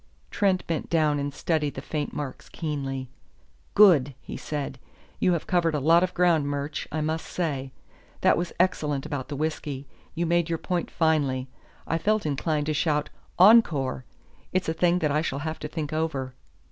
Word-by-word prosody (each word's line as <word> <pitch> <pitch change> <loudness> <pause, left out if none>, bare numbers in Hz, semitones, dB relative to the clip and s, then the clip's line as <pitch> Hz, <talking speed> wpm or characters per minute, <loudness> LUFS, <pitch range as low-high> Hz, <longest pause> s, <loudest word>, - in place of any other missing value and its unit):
Trent 190 -2 +1
bent 165 -2 -3
down 155 -3 +2
and 140 0 -2
studied 150 -1 -1
the 135 - -5
faint 150 -2 -3
marks 145 -3 -6
keenly. 135 -4 -4 0.7
"Good!" 150 -10 +6
he - - -8
said. 140 -3 -4 0.4
"You 180 - +3
have 170 - -2
covered 170 -3 +1
a - - +1
lot 165 +5 +5
of 185 0 -1
ground, 170 -5 +3
Murch, 145 +1 -3
I 155 +1 -1
must 160 +1 -2
say. 140 -7 -2 0.5
That - - +5
was 175 0 -2
excellent 150 -6 +1
about 145 -4 -4
the 145 - -5
whisky 145 -2 -3 0.3
you 170 +1 0
made 170 0 +1
your 165 - 0
point 175 +1 -2
finely. 140 -6 +1 0.4
I 165 - -1
felt 215 +3 +1
inclined 150 +1 0
to 155 - 0
shout 150 0 0 0.3
'Encore!' 175 - +5 0.5
It's 185 - 0
a 160 - +1
thing 175 +1 +2
that 150 - +2
I 150 +2 +2
shall 140 -4 -2
have 160 0 -3
to - - -4
think 155 -2 -4
over." 145 -5 -2
155 Hz, 180 wpm, -26 LUFS, 145-170 Hz, 0.7 s, Good